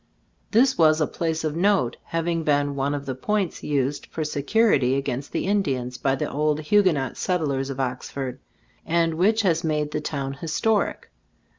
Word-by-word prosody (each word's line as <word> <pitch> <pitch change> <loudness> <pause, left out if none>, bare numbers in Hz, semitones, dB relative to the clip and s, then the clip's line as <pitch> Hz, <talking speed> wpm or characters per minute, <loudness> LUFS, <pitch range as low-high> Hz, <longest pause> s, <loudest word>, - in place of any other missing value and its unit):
This 250 +2 +3
was 155 -1 +5
a 155 - +3
place 160 0 -2
of 155 -1 -2
note, 185 -8 +2
having 165 0 -1
been 145 -2 +1
one 140 +1 -1
of 140 -1 -5
the 135 - -3
points 195 +7 -2
used 140 -1 -1
for 160 - -4
se 150 -1 -3
curity 140 - +3
against 140 0 -3
the - - -2
Indians 135 -12 -1
by 135 0 +1
the - - -2
old 150 +1 0
Huguenot 155 - +2
Settlers 140 -7 -1
of 135 -1 -5
Oxford, 130 0 -4 0.4
and 165 0 +1
which 215 +7 +2
has 165 -4 +2
made 150 -2 -1
the 150 - -2
town 140 -2 -3
historic. 170 +9 -1
150 Hz, 170 wpm, -24 LUFS, 135-170 Hz, 0.4 s, was